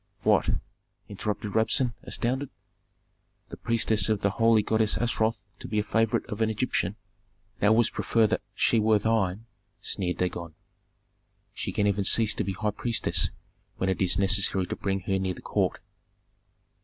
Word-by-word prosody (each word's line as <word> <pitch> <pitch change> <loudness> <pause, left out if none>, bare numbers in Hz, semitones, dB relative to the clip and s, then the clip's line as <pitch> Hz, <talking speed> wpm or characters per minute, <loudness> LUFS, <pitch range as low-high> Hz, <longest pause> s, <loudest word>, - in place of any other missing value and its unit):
"What?" - - +3 0.6
interrupted 105 0 -4
Rabsun, 115 +2 +1
astounded. 130 +3 -2 1.0
"The - - -7
priestess 110 -3 +1
of 110 -2 +1
the 100 - +2
holy 115 0 +3
goddess 110 0 +1
Astaroth 110 -3 0
to - - -8
be 110 - -3
a 105 - +2
favorite 110 +1 +1
of 110 -1 -6
an 110 - +3
Egyptian?" 110 - -1 0.6
"Thou 105 +2 +4
wouldst 115 0 +2
prefer 115 -1 +2
that - - 0
she 115 - +3
were 110 0 +4
thine," 110 -1 0 0.3
sneered 90 -2 -3
Dagon. 85 -3 -3 1.0
"She - - -4
can 105 - 0
even 100 0 +1
cease 110 +3 +4
to - - -2
be 95 - -3
high 105 +2 -1
priestess 105 -7 0 0.5
when 95 - -1
it 95 - -3
is 90 -2 +2
necessary 95 -1 +3
to - - -4
bring 95 -1 -2
her 95 +1 -1
near 95 -1 -2
the - - -12
court." - - 0
105 Hz, 160 wpm, -27 LUFS, 95-110 Hz, 1.0 s, Thou